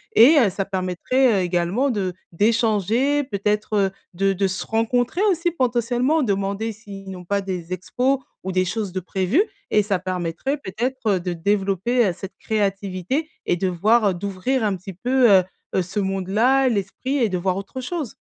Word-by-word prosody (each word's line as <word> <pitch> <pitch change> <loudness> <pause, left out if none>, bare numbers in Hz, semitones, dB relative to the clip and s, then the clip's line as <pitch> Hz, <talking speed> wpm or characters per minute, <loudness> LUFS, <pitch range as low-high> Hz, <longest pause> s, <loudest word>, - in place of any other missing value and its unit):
et 285 +7 +8
heu, 225 -7 +4
ça 195 +1 -3
permettrait 190 +4 +1
également 180 +10 +1
de 190 -5 -2 0.2
d'échanger 225 - +2
peut-être 210 -3 0 0.2
de 195 +2 +2
de 195 +1 +1
se 185 0 -4
rencontrer 245 - 0
aussi 345 -2 +1
potentiellement. 255 +1 +1
Demander 200 +1 -1
s'ils 195 -2 -10
n'ont 180 -1 -9
pas 200 +2 0
des 180 -3 -5
expos 250 +9 0 0.3
ou 190 - -3
des 185 0 +3
choses 205 +1 -3
de 185 - -2
prévues 190 - +1 0.3
et 210 - +3
ça 195 -3 0
permettrait 185 - -2
peut-être 235 -2 -1
de 180 0 -3
développer, 200 +6 +1
heu, 180 - 0
cette 195 - -8
créativité 200 - -1 0.2
et - - +2
de 190 - 0
voir, 210 +5 +3
heu - - 0
d'ouvrir 200 +7 -1
un 205 -2 +1
petit 185 +1 -9
peu, 245 +6 +3
heu, 190 -2 +6 0.3
heu, 190 - +3
ce 190 +4 -4
monde-là, 210 +8 +2
l'esprit 230 +6 -2
et 240 -4 +3
de 185 - -1
voir 185 +1 0
autre 200 +6 -6
chose. 295 -1 -4
200 Hz, 170 wpm, -22 LUFS, 190-245 Hz, 0.3 s, et